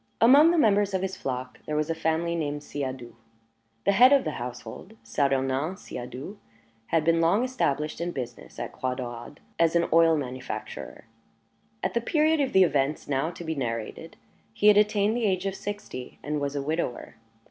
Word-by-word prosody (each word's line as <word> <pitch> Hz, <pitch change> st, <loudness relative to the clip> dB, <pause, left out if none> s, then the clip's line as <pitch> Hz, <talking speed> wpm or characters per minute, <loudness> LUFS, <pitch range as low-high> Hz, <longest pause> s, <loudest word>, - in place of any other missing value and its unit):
Among 280 Hz, +8 st, +7 dB
the 345 Hz, -, +2 dB
members 205 Hz, -7 st, +3 dB
of 190 Hz, -, -1 dB
his 190 Hz, 0 st, -2 dB
flock 125 Hz, -5 st, -5 dB
there 150 Hz, -, -2 dB
was 155 Hz, +2 st, 0 dB
a -, -, +1 dB
family 160 Hz, +1 st, 0 dB
named 145 Hz, -2 st, -3 dB
Siadoux. 130 Hz, -5 st, -5 dB, 0.7 s
The -, -, +5 dB
head 245 Hz, +7 st, +7 dB
of 280 Hz, -2 st, +5 dB
the -, -, -2 dB
household, 125 Hz, -, -8 dB
Saturnin 135 Hz, +4 st, 0 dB
Siadoux, 130 Hz, -, -8 dB, 0.5 s
had 160 Hz, -2 st, +1 dB
been 165 Hz, 0 st, +3 dB
long 185 Hz, +8 st, +3 dB
established 155 Hz, -, -1 dB
in 170 Hz, -, -1 dB
business 120 Hz, -5 st, -7 dB
at 120 Hz, 0 st, -5 dB
Croix 130 Hz, 0 st, -3 dB
Daurade 120 Hz, +2 st, -7 dB, 0.2 s
as 165 Hz, 0 st, +3 dB
an 170 Hz, 0 st, +3 dB
oil 165 Hz, -1 st, +5 dB
manufacturer. 130 Hz, -2 st, -6 dB, 0.8 s
At -, -, -1 dB
the 235 Hz, -, +1 dB
period 310 Hz, +4 st, +2 dB
of 270 Hz, -, 0 dB
the 190 Hz, -, +6 dB
events 145 Hz, -3 st, 0 dB
now 140 Hz, +2 st, 0 dB
to 175 Hz, 0 st, -9 dB
be 160 Hz, -1 st, -2 dB
narrated, 115 Hz, -6 st, -5 dB, 0.4 s
he 210 Hz, -, +5 dB
had 205 Hz, -, +6 dB
attained 210 Hz, +1 st, +3 dB
the 240 Hz, -2 st, 0 dB
age 185 Hz, -1 st, 0 dB
of 195 Hz, -, -1 dB
sixty, 195 Hz, -10 st, -7 dB
and 150 Hz, 0 st, -2 dB
was 140 Hz, 0 st, -2 dB
a 140 Hz, -, -2 dB
widower. 155 Hz, -4 st, -3 dB
160 Hz, 180 wpm, -27 LUFS, 135-200 Hz, 0.8 s, Among